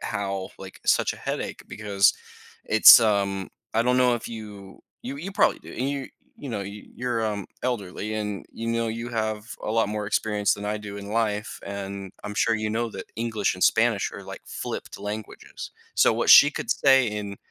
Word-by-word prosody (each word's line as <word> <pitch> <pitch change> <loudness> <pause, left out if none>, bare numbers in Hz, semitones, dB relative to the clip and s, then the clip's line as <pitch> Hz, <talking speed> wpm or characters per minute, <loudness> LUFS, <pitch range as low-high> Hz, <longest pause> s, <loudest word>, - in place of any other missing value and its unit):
how" 100 -2 -3
like, 95 -1 -11
such - - +3
a - - -11
headache - - -4
because 100 -2 +2 0.5
it's, 110 +2 +9
um 100 -3 +1 0.3
I 115 - +3
don't 125 +1 +2
know 125 -1 +4
if 120 - -5
you 105 -4 -9 0.2
you 135 +3 -5
you 185 +6 -6
probably 200 - +3
do, - - -13
and, 130 +3 -2
you 140 -1 -3 0.3
you 140 - -8
know, 105 -3 -3
you're, 115 +4 -4
um, 105 -3 -3 0.2
elderly 110 -3 -3
and 105 -2 -3
you 115 0 -5
know 115 0 0
you 115 +2 -4
have 110 -2 -2 0.2
a - - -3
lot 115 -2 +2
more 105 -1 -3
experience 105 -1 +1
than 100 - -8
I 105 +1 -1
do 100 -1 -8
in 100 0 -8
life, 105 -1 -1
and 100 -1 -6
I'm 105 0 -5
sure 115 +1 +2
you 110 0 -2
know 115 +1 -1
that - - -7
English 115 -2 0
and 90 - -6
Spanish - - +3
are, - - -8
like, - - -9
flipped - - -6
languages, 105 +1 -7 0.2
so - - +5
what - - +1
she 145 - +10
could - - -5
say 135 -2 +5
in 105 -2 -4
105 Hz, 195 wpm, -25 LUFS, 100-115 Hz, 0.5 s, she